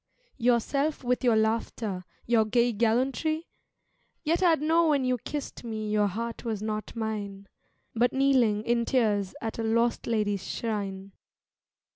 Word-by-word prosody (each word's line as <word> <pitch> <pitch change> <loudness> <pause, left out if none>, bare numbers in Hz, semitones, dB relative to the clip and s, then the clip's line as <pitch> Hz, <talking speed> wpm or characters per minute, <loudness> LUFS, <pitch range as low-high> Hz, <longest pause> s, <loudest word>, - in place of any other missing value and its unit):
Yourself 260 +5 +1
with 250 +1 0
your 240 -3 +4
laughter, 220 -3 -1 0.2
your 230 -2 +4
gay 235 +2 +2
gallantry? 260 +9 0 0.8
Yet 330 +3 +1
I'd 335 -5 +4
know 325 +3 +3
when 285 -4 +2
you 250 -1 +1
kissed 290 +3 -6
me 215 -2 -4
your 210 -1 +3
heart 230 +4 -4
was 225 -4 -2
not 215 +1 -4
mine 205 -3 -4 0.5
But 240 +2 +2
kneeling 255 -6 +3
in 235 0 +1
tears 210 -7 +1
at 225 0 -4
a - - -1
lost 230 +1 +1
lady's 205 -4 0
shrine. 200 -3 -3
230 Hz, 140 wpm, -28 LUFS, 215-255 Hz, 0.8 s, your